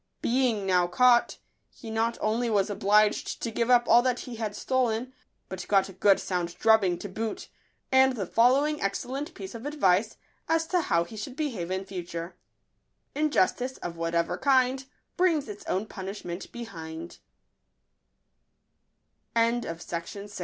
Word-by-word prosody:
Being 240 -5 +1
now 180 -2 +3
caught, 240 +6 +4 0.3
he 225 -4 -10
not 225 +1 0
only 230 +3 0
was 205 -1 +1
obliged 210 +1 +2
to 230 - -2
give 235 +1 -1
up 240 -1 +5
all 235 +1 +7
that 250 0 0
he 240 -3 -8
had 215 -2 -3
stolen, 255 -1 -1 0.3
but 190 -1 -7
got 195 -1 +3
a - - -10
good 195 +1 +4
sound 175 -2 -3
drubbing 215 -6 +4
to 205 - -7
boot, 220 +3 -5 0.4
and 265 0 +5
the 200 -5 -3
following 270 - +3
excellent 265 - -3
piece 195 -1 -8
of 230 +4 -6
advice 215 -8 +1 0.3
as 325 0 +2
to 360 -2 +2
how 170 - +1
he 170 +6 -11
should 220 +5 -6
behave 245 - -3
in 190 +1 -2
future: 175 -2 -6 0.8
Injustice, 265 -3 +1
of 170 -1 -6
whatever 165 0 -1
kind, 265 -1 +2 0.3
Brings 335 -7 +2
its 210 -1 -8
own 190 +3 -1
punishment 190 -3 -7
220 Hz, 140 wpm, -27 LUFS, 190-255 Hz, 0.8 s, all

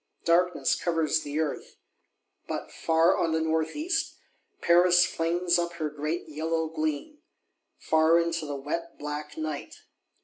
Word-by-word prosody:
Darkness 175 +1 +3
covers 160 -2 0
the 145 +1 -4
Earth. 155 -3 -3 0.7
But, - - -5
far 165 +2 +3
on 165 -1 0
the 160 - +2
North 160 0 0
east, 325 +2 -1 0.4
Paris 175 +1 +5
flings 175 +1 0
up 170 0 -2
her 155 -3 -3
great 150 +3 -3
yellow 160 +1 -2
gleam; 155 - -3 0.6
far 160 +1 +3
into 170 -2 -1
the 145 - -4
wet 165 +5 -5
black 150 0 -6
Night. 155 -2 -5
160 Hz, 135 wpm, -27 LUFS, 155-170 Hz, 0.7 s, Paris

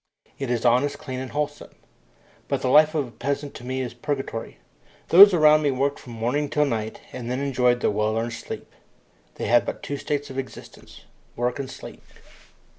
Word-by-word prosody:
It 135 -2 -3
is 120 -1 -1
honest, 135 +4 +3
clean, 130 -3 -6
and 130 0 -5
wholesome. 150 0 -4 0.7
But - - -2
the 130 - +1
life 155 +4 +5
of 145 -4 0
a - - -14
peasant 140 +3 -3
to - - -10
me 130 +1 -3
is 125 -2 -4
purgatory. 135 -3 -4 0.5
Those 200 +4 +10
around 155 -3 +5
me 145 - +2
worked 140 +2 -1
from 120 - -11
morning 125 +6 -1
till 150 +1 +2
night 110 -5 -3
and 120 -2 -6
then 125 +1 -1
enjoyed 125 -3 +1
their - - +2
well 105 +1 0
earned 115 +1 -2
sleep. - - -8 0.6
They - - -4
had 120 0 +4
but - - -6
two 145 - -4
states 145 0 -3
of 130 - -4
existence 130 - -10 0.3
work 120 +3 -1
and 135 -2 -4
sleep. - - -10
130 Hz, 190 wpm, -24 LUFS, 120-145 Hz, 0.7 s, Those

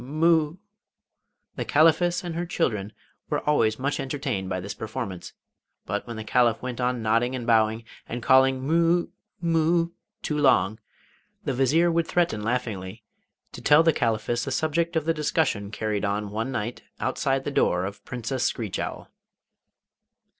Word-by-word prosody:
Mu...' 155 +3 +2 1.0
The - - -1
Caliphess 170 +4 +3
and 175 -2 -4
her 170 +1 -3
children 105 - -1 0.4
were - - -2
always 110 -7 +3
much 140 +2 -2
entertained 130 -9 -3
by 95 - -2
this 100 +2 -5
performance; 110 -4 -6 0.5
but 100 +4 -3
when 115 - -6
the 110 - -5
Caliph 120 0 +2
went 125 -1 -5
on 125 -2 0
nodding 115 +4 +1
and 120 -2 -5
bowing, 110 -1 +2 0.3
and 120 0 -4
calling 130 0 +4
'Mu...mu...' 170 +1 +1 0.3
too 150 - -1
long, 125 -6 +3 0.6
the 135 - -1
Vizier 150 +7 +3
would 165 0 +1
threaten 170 -12 +1
laughingly 110 -3 -3 0.5
to - - -9
tell 150 +2 +6
the 165 -1 +4
Chaliphess 115 0 0
the - - -3
subject 160 +4 0
of 160 -2 0
the 165 - +2
discussion 150 -9 0
carried 105 -1 -2
on 100 0 -1
one 115 +5 -2
night 120 0 -3 0.2
outside 135 -1 0
the 145 - -3
door 90 -9 +2
of 100 +1 -7
Princess 125 +1 -3
Screech 110 -5 -2
Owl. - - -5
130 Hz, 155 wpm, -25 LUFS, 110-160 Hz, 1.0 s, tell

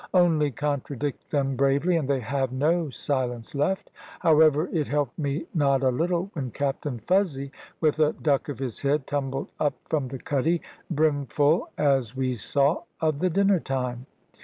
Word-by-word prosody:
Only 165 -5 +4
contradict 145 0 -3
them 135 -2 0
bravely, 140 +6 +2
and 150 -5 -1
they 135 -2 +1
have 130 +2 -1
no 155 +5 +1
silence 125 -2 -3
left." 150 +7 -1 0.3
However, 155 0 +5
it 155 -4 0
helped 145 -2 -1
me 145 +2 -2
not 140 -4 +2
a 130 - +4
little 175 +7 -1
when 135 -7 -3
Captain 140 0 -2
Fuzzy, 165 -8 +1 0.3
with 155 -1 +2
a 155 -1 +4
duck 145 -2 0
of 140 - -4
his 130 -4 -4
head, 140 0 +1
tumbled 135 -1 -3
up 145 -2 +1 0.2
from 150 -5 +1
the 135 +1 -6
cuddy, 150 +6 0 0.3
brimful, 145 +1 +2
as 135 -5 +2
we 130 -1 0
saw, 140 +6 +1 0.2
of 155 -3 0
the 185 - +2
dinner 195 +1 +3
time. 125 -3 -3
145 Hz, 160 wpm, -26 LUFS, 135-155 Hz, 0.3 s, However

